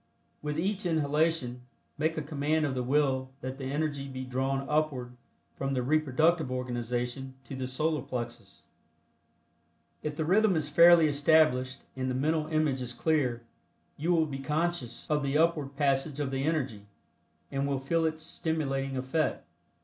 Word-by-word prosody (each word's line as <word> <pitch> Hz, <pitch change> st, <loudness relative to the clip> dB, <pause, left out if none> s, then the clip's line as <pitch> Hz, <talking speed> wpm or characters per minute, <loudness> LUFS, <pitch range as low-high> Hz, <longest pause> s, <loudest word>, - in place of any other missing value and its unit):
With 150 Hz, 0 st, -3 dB
each 195 Hz, +3 st, -1 dB
inhalation 150 Hz, -5 st, +1 dB, 0.3 s
make 160 Hz, +1 st, 0 dB
a 155 Hz, -, -1 dB
command 150 Hz, +1 st, 0 dB
of 140 Hz, -, -1 dB
the 130 Hz, -, -1 dB
Will 130 Hz, 0 st, +1 dB
that 130 Hz, +2 st, -5 dB
the 135 Hz, -, -4 dB
energy 145 Hz, 0 st, -2 dB
be 130 Hz, -1 st, -6 dB
drawn 135 Hz, +2 st, -1 dB
upward 145 Hz, -5 st, -1 dB, 0.4 s
from 135 Hz, 0 st, -2 dB
the 125 Hz, -, 0 dB
reproductive 155 Hz, +2 st, +2 dB
organization 125 Hz, +1 st, -3 dB
to 135 Hz, +2 st, -7 dB
the 130 Hz, -1 st, -3 dB
Solar 155 Hz, +4 st, 0 dB
Plexus. 120 Hz, -1 st, -6 dB, 1.4 s
If 150 Hz, -1 st, -3 dB
the 160 Hz, 0 st, -1 dB
rhythm 195 Hz, +3 st, +4 dB
is 150 Hz, -2 st, -1 dB
fairly 170 Hz, +1 st, +7 dB
established 145 Hz, -3 st, +3 dB
and 130 Hz, 0 st, -2 dB
the 130 Hz, -, -1 dB
mental 155 Hz, +3 st, +1 dB
image 155 Hz, -4 st, +1 dB
is 125 Hz, -, -4 dB
clear, 130 Hz, -7 st, 0 dB, 0.5 s
you 160 Hz, +5 st, -1 dB
will 165 Hz, -2 st, +4 dB
be 140 Hz, -3 st, -5 dB
conscious 150 Hz, -4 st, -2 dB
of 150 Hz, -1 st, +1 dB
the 140 Hz, +1 st, +1 dB
upward 155 Hz, -4 st, +1 dB
passage 140 Hz, +1 st, +1 dB
of 140 Hz, -2 st, -1 dB
the 135 Hz, +1 st, -1 dB
energy, 130 Hz, -10 st, -1 dB, 0.6 s
and 140 Hz, 0 st, -1 dB
will 140 Hz, -1 st, 0 dB
feel 165 Hz, +5 st, 0 dB
its 160 Hz, 0 st, -1 dB
stimulating 135 Hz, -5 st, -2 dB
effect. 130 Hz, +5 st, -1 dB
145 Hz, 155 wpm, -29 LUFS, 130-155 Hz, 1.4 s, fairly